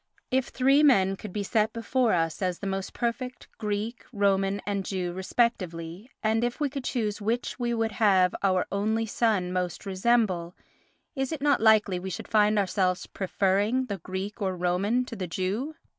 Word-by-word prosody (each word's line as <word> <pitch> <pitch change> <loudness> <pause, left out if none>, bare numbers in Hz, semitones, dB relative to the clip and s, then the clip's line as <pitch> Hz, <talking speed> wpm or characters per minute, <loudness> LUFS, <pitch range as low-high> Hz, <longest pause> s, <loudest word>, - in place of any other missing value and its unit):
If 260 -1 +1
three 270 +3 +3
men 195 -10 +4
could 205 +1 -8
be 205 +2 -2
set 215 +2 +1
before 235 +1 +1
us 165 -1 0
as 180 -2 0
the - - -7
most 195 0 -3
perfect 250 +1 -3
Greek, 210 +1 -3
Roman 200 -2 +1
and 200 -1 -1
Jew 180 -2 -3
respectively, 185 -1 -1
and 220 +1 +2
if 240 +3 -2
we 290 -3 0
could 275 -2 -5
choose 215 -5 -2
which 230 +5 -2
we 240 -1 0
would 225 -1 0
have 195 -5 +3
our 185 -2 +2
only 220 +3 0
son 210 -5 0
most 180 +1 -2
resemble, 190 -3 +1 0.6
is 270 -2 -2
it 305 -3 -4
not 285 -5 +3
likely 215 -4 +4
we 190 +1 -5
should 185 - -6
find 210 0 +3
ourselves 185 -2 +1
preferring 200 +6 0
the 200 -5 -5
Greek 190 +5 -5
or 190 -2 0
Roman 195 +8 +1
to 240 - -7
the 185 -4 -4
Jew? 200 - -2
205 Hz, 175 wpm, -27 LUFS, 185-235 Hz, 0.6 s, men